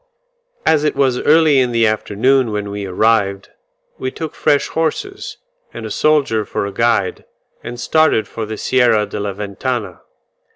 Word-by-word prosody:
As 155 -2 +3
it 150 - 0
was 135 -3 +1
early 155 -2 +4
in 125 -2 +1
the 115 -1 +3
afternoon 110 +4 +1
when 105 -1 -3
we 100 -1 -5
arrived, 100 0 +1 0.5
we 130 - -2
took 160 +3 -6
fresh 145 - +1
horses, 165 - -3 0.4
and - - -6
a - - -6
soldier 140 -8 +2
for 100 - -3
a 100 - -4
guide, 115 -3 0 0.4
and 120 0 -7
started 140 -1 +2
for 110 -2 -6
the 110 0 -5
Sierra 120 -3 +2
de 100 - -6
la 100 -1 -3
Ventana. 105 +4 -4
115 Hz, 160 wpm, -17 LUFS, 105-140 Hz, 0.5 s, early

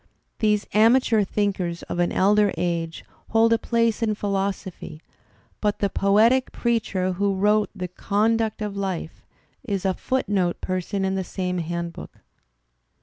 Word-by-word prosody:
These 210 -1 +2
amateur 225 0 +4
thinkers 190 -4 -2
of 175 - -5
an 175 - +2
elder 205 +1 +3
age 165 -2 -2 0.2
hold 225 +1 +4
a 230 - +2
place 230 -1 +1
in 215 -2 +1
philosophy; 195 -5 -3 0.6
but 210 -1 +1
the 200 -2 -1
poetic 225 +6 +3
preacher 215 -6 0
who 200 +1 0
wrote 210 +2 +2
"The 185 -2 -4
Conduct 215 +4 0
of 205 -1 -4
Life" 190 -5 -4 0.4
is 200 -6 -3
a 190 - +2
footnote 200 -8 -1
person 185 +2 -2
in 190 - 0
the 190 0 -1
same 180 -1 -3
handbook. 170 0 -5
200 Hz, 140 wpm, -24 LUFS, 185-215 Hz, 0.6 s, amateur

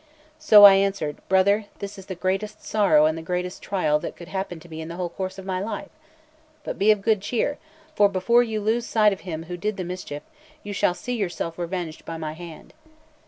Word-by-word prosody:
So 215 -10 +8
I 200 -1 +12
answered: 195 -7 -1
"Brother, 200 +3 +3
this 200 0 -7
is 190 - -13
the 185 - -5
greatest 190 +4 -2
sorrow 185 -8 +4
and 155 0 +2
the 165 - -6
greatest 180 +2 -3
trial 155 -6 +1
that - - -6
could 170 0 -11
happen 190 -3 -4
to 175 - -15
me 160 -1 -7
in 160 - -7
the 170 - -7
whole 180 -1 -3
course 190 +2 -5
of 195 - -9
my 185 -1 -2
life. 210 +4 -5 0.7
But - - -5
be 205 - +3
of 210 -2 +4
good 215 -3 +2
cheer; 250 +7 -1 0.3
for 205 -8 +4
before 205 +6 +3
you 220 -3 -2
lose 230 +3 0
sight 215 -2 +4
of 195 - -8
him 165 -3 -6
who 175 +1 -6
did 210 +3 -2
the 185 - -3
mischief, 175 -5 -6 0.4
you 205 - -6
shall 180 -2 +1
see 245 +5 -4
yourself 175 -5 -3
revenged 175 -2 -4
by 165 - -6
my 155 -1 -4
hand. 165 -1 -11
190 Hz, 220 wpm, -24 LUFS, 170-205 Hz, 0.7 s, I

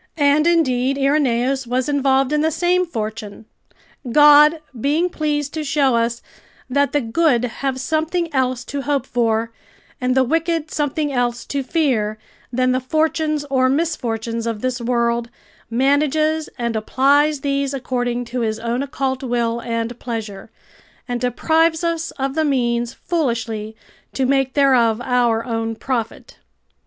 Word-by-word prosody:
And, 290 +1 +3
indeed, 275 -6 +2
Irenaeus 270 -2 +1
was 250 +1 -1
involved 275 -1 +2
in 300 - +2
the 315 - +2
same 355 +3 +1
fortune. 220 -5 -6 0.7
God, 295 +3 +7 0.2
being 315 +7 +1
pleased 295 -2 -2
to 315 - -3
show 280 -3 +2
us, 235 0 -1 0.4
that 280 +2 +1
the 290 - +1
good 245 +1 +2 0.2
have 265 -1 -1
something 320 +4 -1
else 255 -2 0
to 285 - -4
hope 280 0 -1
for 230 -1 0 0.5
and 250 0 +1
the 265 - +5
wicked 325 +2 -1
something 295 0 -1
else 240 -1 -1
to 280 - -2
fear, 255 -8 0 0.3
than 255 +1 +1
the 255 - +1
fortunes 310 +2 0
or 260 -1 +3
misfortunes 235 -7 -2
of 225 -2 -3
this 255 -1 -2
world, 235 0 0 0.4
manages 300 +5 +1
and 235 -2 -2
applies 280 +6 +2
these 275 -1 -1
according 245 -2 -2
to 245 +2 -4
His 220 -2 -1
own 235 +3 -2
occult 265 -1 -2
will 235 -2 -1
and 230 0 -3
pleasure, 220 -4 -6 0.6
and 245 -1 -3
deprives 320 +6 +1
us 335 -1 -1
of 270 0 -2
the 315 +1 +1
means 240 -4 0
foolishly 230 -9 -3 0.4
to 265 - 0
make 270 0 +1
thereof 250 -6 +3
our 240 -2 +1
own 225 -1 -2
profit. 230 -1 -4
260 Hz, 145 wpm, -20 LUFS, 235-295 Hz, 0.7 s, God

